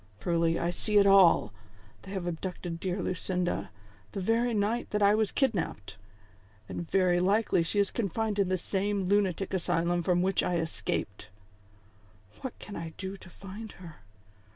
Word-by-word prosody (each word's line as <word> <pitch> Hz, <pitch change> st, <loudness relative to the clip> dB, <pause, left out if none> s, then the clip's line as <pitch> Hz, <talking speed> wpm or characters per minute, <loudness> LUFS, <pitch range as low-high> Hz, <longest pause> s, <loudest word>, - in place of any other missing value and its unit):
Truly, 165 Hz, +5 st, +1 dB
I 170 Hz, -, 0 dB
see 210 Hz, +4 st, +2 dB
it 200 Hz, -, +6 dB
all. 195 Hz, -3 st, +6 dB, 0.5 s
They 190 Hz, -, -11 dB
have 190 Hz, -3 st, -3 dB
abducted 175 Hz, 0 st, -4 dB
dear 185 Hz, +1 st, -2 dB
Lucinda 180 Hz, 0 st, -2 dB, 0.4 s
the 200 Hz, -, -3 dB
very 230 Hz, +5 st, +1 dB
night 220 Hz, +2 st, 0 dB
that 210 Hz, -1 st, 0 dB
I 200 Hz, +1 st, +6 dB
was 215 Hz, -1 st, +1 dB
kidnap 245 Hz, -, 0 dB
ped, 95 Hz, 0 st, -13 dB, 0.7 s
and 170 Hz, -, -6 dB
very 180 Hz, -2 st, +3 dB
likely 200 Hz, 0 st, +2 dB
she 165 Hz, +5 st, -1 dB
is 200 Hz, -, +2 dB
confined 215 Hz, 0 st, -1 dB
in 195 Hz, -2 st, +2 dB
the 185 Hz, -, +1 dB
same 195 Hz, +1 st, -1 dB
lunatic 195 Hz, -1 st, +1 dB
asylum 175 Hz, -1 st, +1 dB
from 175 Hz, +1 st, +2 dB
which 190 Hz, 0 st, +2 dB
I 180 Hz, -, 0 dB
escaped. 165 Hz, -1 st, -3 dB, 0.5 s
" 100 Hz, 0 st, -28 dB
What 260 Hz, -, -6 dB
can 205 Hz, -, -9 dB
I 165 Hz, -1 st, -6 dB
do 190 Hz, 0 st, -5 dB
to 185 Hz, -, -14 dB
find 200 Hz, +4 st, -9 dB
her 170 Hz, -4 st, -12 dB
185 Hz, 170 wpm, -29 LUFS, 170-205 Hz, 0.7 s, it